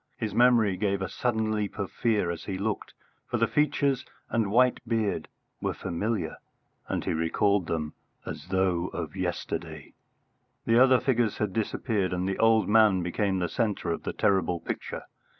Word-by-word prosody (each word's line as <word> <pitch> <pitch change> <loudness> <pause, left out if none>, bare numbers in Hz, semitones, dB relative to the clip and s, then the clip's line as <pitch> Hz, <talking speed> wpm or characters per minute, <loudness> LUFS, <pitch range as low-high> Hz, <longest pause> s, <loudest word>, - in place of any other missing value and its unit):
His 110 -4 -3
memory 115 -5 +4
gave 100 0 0
a - - -2
sudden 110 +1 -1
leap 105 -1 -2
of 100 -3 -3
fear 105 -7 +1
as 85 -1 -7
he 95 -2 -3
looked, 105 +2 -3 0.3
for 120 - -1
the 115 - +3
features 140 -1 +1 0.3
and 115 -4 +1
white 125 +4 +4
beard 110 -3 0 0.3
were - - -1
familiar, 95 0 -2 0.5
and - - -2
he - - 0
recalled 90 +4 +1
them 75 -2 -2 0.3
as - - -7
though 90 -2 +1
of 85 -1 -5
yesterday. 90 -2 -4 0.7
The 115 +1 +4
other 130 -1 +5
figures 120 -5 +1
had 105 -3 -1
disappeared, 105 -3 -1
and 90 +1 -1
the 95 - -2
old 115 -1 +4
man 105 -4 +5
became 95 +2 0
the 90 -1 0
centre 105 -1 -1
of 85 - -2
the - - -3
terrible 95 -4 +1
picture. - - -5
105 Hz, 170 wpm, -28 LUFS, 90-115 Hz, 0.7 s, other